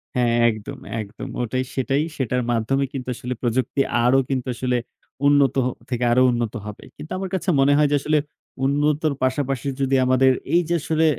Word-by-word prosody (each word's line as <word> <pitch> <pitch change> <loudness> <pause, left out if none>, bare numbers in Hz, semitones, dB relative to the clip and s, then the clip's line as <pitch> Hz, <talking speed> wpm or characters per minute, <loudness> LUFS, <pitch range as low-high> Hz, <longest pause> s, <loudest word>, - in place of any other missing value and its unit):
হ্যাঁ, 120 -2 +2 0.2
একদম, 110 -2 -6 0.2
একদম। 105 +5 -8
ওটাই। 130 +2 -1
সেটাই। 135 +3 +1
সেটার 125 -1 0
মাধ্যমে 120 +4 +1
কিন্তু 130 -3 -5
আসলে 125 +2 -4
প্রযুক্তি 130 +3 0 0.2
আরো 125 +2 +4
কিন্তু 130 -2 -2
আসলে 125 0 0 0.5
উন্নত 140 -3 +4
হ - - +2 0.2
থেকে 125 -1 -1
আরো 125 +2 +4
উন্নত 120 -2 -2
হবে। 105 -1 -8
কিন্তু 155 - -10
আমার 190 0 -4
কাছে 185 0 -2
মনে 135 +1 +5
হয় 150 0 +4
যে - - +4
আসলে 155 +2 +1 0.5
উন্নতর 150 +2 +1
পাশাপাশি 135 0 -1
যদি 135 0 +2
আমাদের 130 +1 +4 0.2
এইযে 175 -1 +2
আসলে 160 +1 +1
130 Hz, 170 wpm, -22 LUFS, 125-145 Hz, 0.5 s, মনে